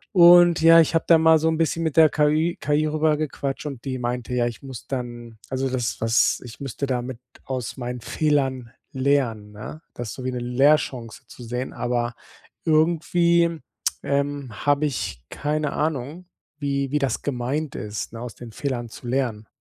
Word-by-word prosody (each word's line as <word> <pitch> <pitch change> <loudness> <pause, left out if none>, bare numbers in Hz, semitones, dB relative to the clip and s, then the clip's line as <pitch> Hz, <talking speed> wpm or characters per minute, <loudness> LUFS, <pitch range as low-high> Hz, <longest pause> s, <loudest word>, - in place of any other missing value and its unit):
Und 175 -1 +8
ja, 165 +1 +8
ich 160 - +1
habe 165 - +1
da 165 - +7
mal 160 0 +5
so 160 - +1
'n 160 0 +1
bisschen 165 +1 0
mit 160 -3 -1
der 160 -2 +7
KI 155 +3 +1
KI 150 +1 +1
rüber 155 0 +2
gequatscht 145 -1 -3
und 140 -4 -6
die 130 -1 -2
meinte: 125 0 -3
Ja, 120 -1 +2
ich 120 -2 -5
muss 130 -4 -9
dann, 120 -3 -6
also, 135 0 -1
das 125 -4 -2
was 115 +1 +2
ich 120 +2 -11
müsste 140 0 -4
damit 125 -2 -3 0.3
aus 130 -2 -4
meinen 125 -1 -5
Fehlern 135 -4 0 0.2
lernen, 130 -6 0
ne, 110 +9 -9
das 120 -2 -6
ist - - -6
so 130 - -7
wie 130 - -1
'ne 125 - -3
Lehrchance 125 -1 +1
zu 125 - -12
sehen, 125 +2 -4
aber 120 -1 -2 0.5
irgendwie, 170 +1 +2 0.4
ähm, 140 -1 -1 0.2
habe 145 +1 +3
ich 95 - -3
keine 150 0 -2
Ahnung, 155 +3 -3 0.3
wie 140 -1 -1
wie 150 - +1
das 135 -2 -1
gemeint 140 +3 -2
ist, 105 +1 -5
ne, 115 - -8
aus 120 -1 -7
den 120 -2 -10
Fehlern 120 -2 -3
zu 120 - -10
lernen. 120 -4 -1
135 Hz, 180 wpm, -23 LUFS, 120-155 Hz, 0.5 s, Und